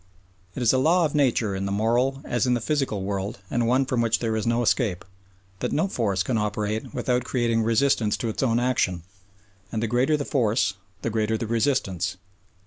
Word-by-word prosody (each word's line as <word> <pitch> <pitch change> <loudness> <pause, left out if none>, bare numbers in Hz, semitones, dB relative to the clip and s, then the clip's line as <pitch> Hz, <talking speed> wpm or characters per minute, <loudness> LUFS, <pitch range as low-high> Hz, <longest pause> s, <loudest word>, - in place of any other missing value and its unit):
It 125 - -2
is 115 - +4
a 130 - +3
law 170 +5 +4
of 150 - -2
nature 125 -8 +1
in 95 +1 -2
the - - -3
moral 120 +6 +1
as 120 -1 0
in 125 - +3
the - - 0
physical 130 -6 -1
world 100 +3 -3
and 120 -1 +1
one 130 +3 +3
from 125 -2 0
which 115 -1 +2
there 115 -2 -1
is 110 0 -2
no 120 +1 +2
escape 110 -7 0 0.5
that - - -2
no 160 - +1
force 100 - 0
can 115 -1 0
operate 105 +3 -2
without 125 +2 0
creating 120 -2 0
resistance 115 -1 +2
to 115 - -3
its 110 - -3
own 120 -3 +2
action, 105 -9 0 0.7
and 110 -1 -2
the - - +2
greater 125 +7 +2
the 145 - -3
force 115 -6 +1 0.3
the 115 - -1
greater 110 0 0
the 115 - -3
resistance. 110 - 0
115 Hz, 205 wpm, -25 LUFS, 105-130 Hz, 0.7 s, is